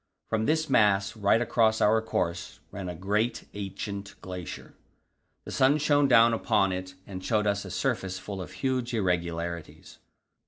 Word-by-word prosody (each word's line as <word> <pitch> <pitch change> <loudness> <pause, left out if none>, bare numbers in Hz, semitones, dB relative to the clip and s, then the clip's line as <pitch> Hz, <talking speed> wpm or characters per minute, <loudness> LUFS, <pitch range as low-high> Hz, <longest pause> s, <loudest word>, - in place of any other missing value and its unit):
From 110 0 0
this 160 +1 +1
mass, 105 -5 +3
right 105 +1 +3
across 110 -2 +2
our 110 +2 +4
course, 90 -5 -3
ran 95 -2 -5
a 90 - -5
great, 105 +6 -1
ancient 100 0 -6
glacier; 90 -2 -8 0.7
the - - -7
sun 135 +3 +4
shone 145 -1 +3
down 115 -2 +6
upon 105 -4 +2
it 95 0 -5
and 95 -2 -8
showed 105 0 +1
us 100 -1 0
a - - -7
surface 95 -1 -2
full 95 0 -6
of 85 - -8
huge 130 -2 -1
irregularities. 85 -4 -3
100 Hz, 155 wpm, -28 LUFS, 95-115 Hz, 0.7 s, down